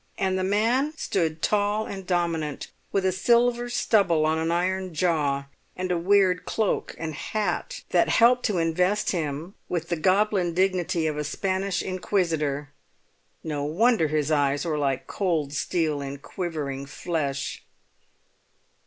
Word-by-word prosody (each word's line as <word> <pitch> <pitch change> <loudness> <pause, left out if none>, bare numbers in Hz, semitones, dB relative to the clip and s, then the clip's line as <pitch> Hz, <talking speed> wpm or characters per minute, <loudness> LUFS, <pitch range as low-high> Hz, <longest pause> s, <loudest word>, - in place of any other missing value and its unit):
And 190 -1 0
the 185 - 0
man 230 +9 +1
stood 160 - -1
tall 210 +1 +1
and 195 -2 -7
dominant, 165 -5 -1 0.2
with 195 -1 +1
a 190 - +3
silver 240 +5 +2
stubble 185 -9 +2
on 160 +1 +1
an 160 0 -1
iron 185 0 -1
jaw, 145 -5 +1 0.3
and 185 0 -2
a 175 - +2
weird 185 0 +3
cloak 220 -3 -1
and 160 -1 -4
hat 215 - -3
that - - +3
helped 245 +1 +5
to 205 -5 -1
invest 180 +5 +1
him 160 +1 -3 0.2
with 170 -1 -2
the 175 - +1
goblin 185 0 +2
dignity 180 -3 +1
of 155 -1 -1
a - - -1
Spanish 190 +5 -1
inquisitor; 160 -7 -1 0.7
no 150 -3 -3
wonder 185 +4 +3
his 150 0 0
eyes 145 0 +2
were 155 -3 -1
like 135 -2 0
cold 160 -8 -1
steel 155 -2 0
in 140 0 -5
quivering 145 -4 -4
flesh. 145 -3 -3
175 Hz, 145 wpm, -25 LUFS, 155-195 Hz, 0.7 s, helped